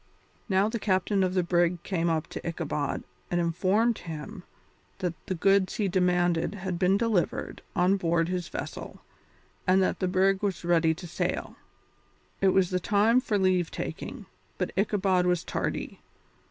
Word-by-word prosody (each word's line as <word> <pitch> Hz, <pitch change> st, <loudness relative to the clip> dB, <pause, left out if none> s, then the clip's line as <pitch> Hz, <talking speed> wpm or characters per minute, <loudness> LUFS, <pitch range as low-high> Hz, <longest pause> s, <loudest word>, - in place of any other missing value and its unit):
Now 190 Hz, +1 st, +3 dB
the 230 Hz, +1 st, -3 dB
captain 190 Hz, 0 st, +1 dB
of 185 Hz, 0 st, 0 dB
the 185 Hz, -, +3 dB
brig 175 Hz, 0 st, +1 dB
came 170 Hz, -3 st, 0 dB
up 160 Hz, -2 st, 0 dB
to -, -, -5 dB
Ichabod 160 Hz, -4 st, -2 dB, 0.3 s
and 175 Hz, -, 0 dB
informed 190 Hz, +7 st, +1 dB
him 160 Hz, +1 st, -7 dB, 0.6 s
that 180 Hz, -3 st, -2 dB
the 185 Hz, -, -1 dB
goods 195 Hz, +2 st, +3 dB
he 210 Hz, -3 st, 0 dB
demanded 180 Hz, -1 st, +1 dB
had 185 Hz, -3 st, -4 dB
been 190 Hz, +2 st, +3 dB
delivered 220 Hz, -5 st, -1 dB
on 190 Hz, +1 st, +3 dB
board 165 Hz, -2 st, +1 dB
his 180 Hz, -1 st, -2 dB
vessel, -, -, -7 dB, 0.7 s
and 185 Hz, +1 st, +5 dB
that -, -, 0 dB
the 185 Hz, -, 0 dB
brig 190 Hz, +1 st, +2 dB
was 190 Hz, -5 st, -2 dB
ready 165 Hz, -2 st, +3 dB
to 175 Hz, -, -9 dB
sail. 170 Hz, -, -3 dB, 0.9 s
It 195 Hz, -, +4 dB
was 190 Hz, -1 st, +3 dB
the 180 Hz, -, +1 dB
time 215 Hz, +6 st, +3 dB
for 215 Hz, -5 st, 0 dB
leave 185 Hz, -3 st, +2 dB
taking, -, -, -6 dB, 0.3 s
but -, -, -2 dB
Ichabod 190 Hz, -2 st, +2 dB
was 180 Hz, -1 st, +1 dB
tardy. -, -, -3 dB
185 Hz, 160 wpm, -28 LUFS, 175-195 Hz, 0.9 s, and